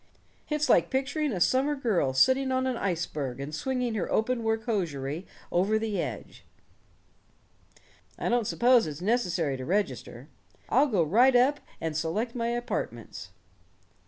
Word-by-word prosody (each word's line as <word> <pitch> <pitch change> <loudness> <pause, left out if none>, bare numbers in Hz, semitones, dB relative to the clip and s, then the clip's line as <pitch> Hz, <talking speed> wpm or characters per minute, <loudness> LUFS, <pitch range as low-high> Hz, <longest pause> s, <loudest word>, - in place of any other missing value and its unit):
"It's 300 -1 0
like - - +4
picturing 275 +2 -1
a 190 - -2
summer 265 +10 +2
girl 215 - +1
sitting 260 - +3
on 260 0 +1
an 260 -1 0
iceberg 160 - -3
and 140 +2 -6
swinging 250 - -2
her 210 -5 -2
open 235 +2 +1
work 225 0 -1
hosiery 165 - -2 0.2
over 195 +5 +2
the 220 -2 -1
edge. - - -7 1.7
I - - -3
don't 235 -3 +1
suppose 245 -4 +4
it's 150 -1 -6
necessary 180 - 0
to 130 - -6
register. 195 +8 -2 0.4
I'll 290 - +4
go 200 -10 +2
right 240 - +4
up 270 +4 +4 0.2
and 160 -1 -3
select 195 +10 -2
my 235 -2 -2
apartments." 240 +1 -4
225 Hz, 145 wpm, -28 LUFS, 170-255 Hz, 1.7 s, like